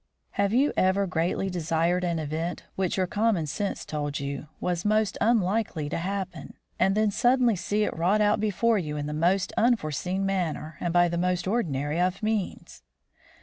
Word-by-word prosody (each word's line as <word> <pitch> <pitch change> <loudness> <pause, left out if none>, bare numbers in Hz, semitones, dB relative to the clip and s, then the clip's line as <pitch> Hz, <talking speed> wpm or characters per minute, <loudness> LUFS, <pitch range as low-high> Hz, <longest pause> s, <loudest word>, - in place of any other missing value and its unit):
Have 200 0 0
you 270 +6 +3
ever 190 +2 +2
greatly 175 +2 -1
desired 170 +1 0
an 170 -2 0
event 160 +3 -3
which 190 -1 -1
your 185 - +2
common 205 -3 +1
sense 195 +7 -3
told 145 -1 -3
you 140 +1 -5
was 175 -1 -1
most 215 -1 +2
unlikely 205 -8 +1
to - - -2
happen, 185 -1 -4 0.2
and 195 +1 +3
then 215 -1 +2
suddenly 245 0 +3
seen 205 +4 0
it - - -2
wrought 180 +6 +2
out 210 0 +3
before 215 +2 +2
you 150 -4 -4
in 145 - -3
the 150 - -4
most 180 +5 +1
unforeseen 190 - +1
manner 165 -5 -2
and 175 - -1
by 175 0 +4
the 170 0 -2
most 180 0 0
ordinary 160 - 0
of 185 +3 0
means? 215 - -3
180 Hz, 175 wpm, -27 LUFS, 165-210 Hz, 0.2 s, by